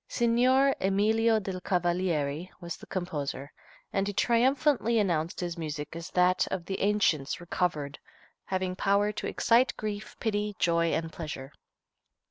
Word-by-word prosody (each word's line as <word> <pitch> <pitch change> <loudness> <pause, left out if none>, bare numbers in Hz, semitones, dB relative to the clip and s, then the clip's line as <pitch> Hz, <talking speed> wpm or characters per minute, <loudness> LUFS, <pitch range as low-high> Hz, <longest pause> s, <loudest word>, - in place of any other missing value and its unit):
Signor 255 +3 +3
Emilio 220 +4 +3
del 190 -2 -5
Cavalieri 175 -3 0
was 170 -2 -5
the - - -14
composer, 145 -6 -4 0.4
and 195 0 +1
he 205 - -2
triumphantly 240 +2 +2
announced 170 -6 0
his 175 -1 -4
music 150 -1 -5
as 170 +2 -6
that 180 0 +3
"of 180 -3 -3
the 195 - -3
ancients 195 -9 +1
recovered," 165 -4 -2 0.5
having 185 -1 -2
power 200 +2 +2
to - - -4
"excite 240 +3 +3
grief, 210 -1 -5
pity, 210 -2 -1
joy 170 -1 +2
and 160 0 -2
pleasure." 150 -4 -6
185 Hz, 135 wpm, -29 LUFS, 170-210 Hz, 0.5 s, Signor